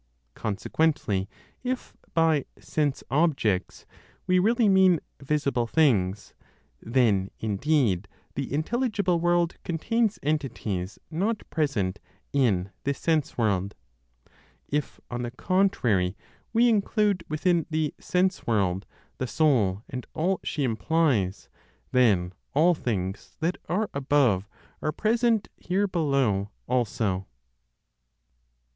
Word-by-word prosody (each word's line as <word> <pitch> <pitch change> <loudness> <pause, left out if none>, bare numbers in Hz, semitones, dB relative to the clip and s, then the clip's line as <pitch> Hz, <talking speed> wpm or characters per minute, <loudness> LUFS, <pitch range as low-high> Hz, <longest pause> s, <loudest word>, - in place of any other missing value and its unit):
Consequently 105 -2 0 0.3
if, 255 0 -3 0.2
by 160 -4 +3
"sense 145 -3 -1
objects" 135 - +1 0.4
we 185 0 +3
really 225 +4 +3
mean 190 -3 +5 0.2
"visible" 140 -4 0
things, 105 - +2 0.5
then 110 -6 +2
indeed 110 - +1 0.3
the 135 -1 -4
intelligible 200 - 0
world 175 0 +2
contains 220 +6 0
entities 115 -11 -2
not 200 +7 -1
present 110 - 0 0.3
in 100 -9 +2
this 140 0 -1
sense 160 -3 0
world. 100 -4 0 0.9
If, 145 -1 -2
on 120 0 -3
the 120 - -3
contrary, 120 - +1 0.3
we 235 +1 +4
include 210 -4 +2
within 165 +1 +1
the 155 -2 0
"sense 185 +1 0
world" 100 -4 +1 0.3
the 130 - -1
soul 110 -8 +2
and 125 -1 -6
all 180 +4 +1
she 150 - -2
implies, 120 - +1 0.4
then 100 -8 +3 0.2
all 165 +5 +5
things 100 - -3
that 170 +3 -1
are 210 +4 +1
above 130 -8 +2 0.3
are 155 - 0
present 225 +2 +1
here 195 +3 0
below 135 - +1 0.2
also. 110 -6 0
140 Hz, 105 wpm, -26 LUFS, 105-175 Hz, 0.9 s, mean